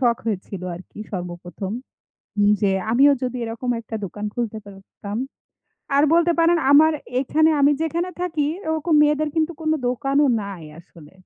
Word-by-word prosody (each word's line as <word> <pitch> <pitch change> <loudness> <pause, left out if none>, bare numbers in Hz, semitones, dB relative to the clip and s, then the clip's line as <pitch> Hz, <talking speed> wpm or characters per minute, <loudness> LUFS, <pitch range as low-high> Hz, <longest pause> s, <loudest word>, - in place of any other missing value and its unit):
শখ 240 -2 +3
হইছিল 195 -3 -4
আর 170 - -9
কি - - -14
সর্বপ্রথম। 175 +1 -6 0.9
যে, 205 - +2 0.2
আমিও 275 +5 +6
যদি 255 0 -2
এরকম 230 +2 -4
একটা 225 0 -9
দোকান 205 +3 -6
খুলতে 230 -2 -3
পারতাম। 200 +1 -9 0.8
আর 285 - +5
বলতে 340 +1 +4
পারেন, 335 +1 +4
আমার 315 +2 +7 0.3
এখানে 315 +4 +3
আমি 285 +1 +5
যেখানে 335 +3 -1
থাকি, 325 -4 -1 0.3
ওরকম 320 +1 0
মেয়েদের 300 +1 +1
কিন্তু 320 +1 +1
কোন 310 0 0 0.2
দোকানও 275 +3 +1 0.2
নাই 200 -4 -7 0.2
আসলে। 165 -3 -16
255 Hz, 150 wpm, -22 LUFS, 200-315 Hz, 0.9 s, আমার